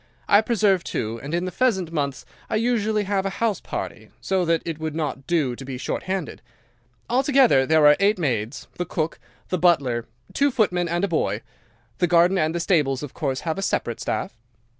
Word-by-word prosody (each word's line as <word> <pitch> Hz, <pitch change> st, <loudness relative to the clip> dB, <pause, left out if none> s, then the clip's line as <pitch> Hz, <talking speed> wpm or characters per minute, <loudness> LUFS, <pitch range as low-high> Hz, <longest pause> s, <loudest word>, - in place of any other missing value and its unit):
I 205 Hz, -, +6 dB
preserve, 210 Hz, -5 st, +2 dB
too, 115 Hz, -5 st, -3 dB
and 140 Hz, -, -6 dB
in 175 Hz, +2 st, 0 dB
the 185 Hz, -, -3 dB
pheasant 190 Hz, -10 st, +1 dB
months 140 Hz, -5 st, -2 dB, 0.2 s
I -, -, -1 dB
usually 220 Hz, -2 st, +1 dB
have 195 Hz, -1 st, 0 dB
a 195 Hz, -, -1 dB
house 225 Hz, -4 st, 0 dB
party, -, -, -6 dB
so 190 Hz, -1 st, 0 dB
that 165 Hz, -1 st, +1 dB
it 165 Hz, -2 st, -4 dB
would 160 Hz, -1 st, -4 dB
not 140 Hz, -4 st, -3 dB
do 150 Hz, -8 st, +1 dB
to 135 Hz, -, -9 dB
be 135 Hz, -1 st, -6 dB
short -, -, -3 dB
handed. 185 Hz, -4 st, -3 dB, 0.7 s
Altogether 255 Hz, -, +4 dB
there 155 Hz, -1 st, +4 dB
are 150 Hz, 0 st, +8 dB
eight 200 Hz, +1 st, +3 dB
maids, 125 Hz, -5 st, -2 dB
the 180 Hz, -, 0 dB
cook, 160 Hz, -2 st, -3 dB, 0.3 s
the 185 Hz, -, -1 dB
butler, 135 Hz, -9 st, +2 dB, 0.3 s
two 285 Hz, +1 st, +3 dB
footmen, 180 Hz, -9 st, +1 dB
and 175 Hz, +2 st, -1 dB
a -, -, +3 dB
boy. 115 Hz, -, -1 dB, 0.6 s
The 175 Hz, -, +3 dB
garden 175 Hz, +2 st, +4 dB
and 155 Hz, +2 st, 0 dB
the -, -, 0 dB
stables 150 Hz, -6 st, +1 dB
of 145 Hz, -, -7 dB
course 135 Hz, -5 st, -2 dB
have 165 Hz, +2 st, -2 dB
a -, -, -2 dB
separate 120 Hz, -, -1 dB
staff. -, -, -3 dB
170 Hz, 200 wpm, -23 LUFS, 140-195 Hz, 0.7 s, are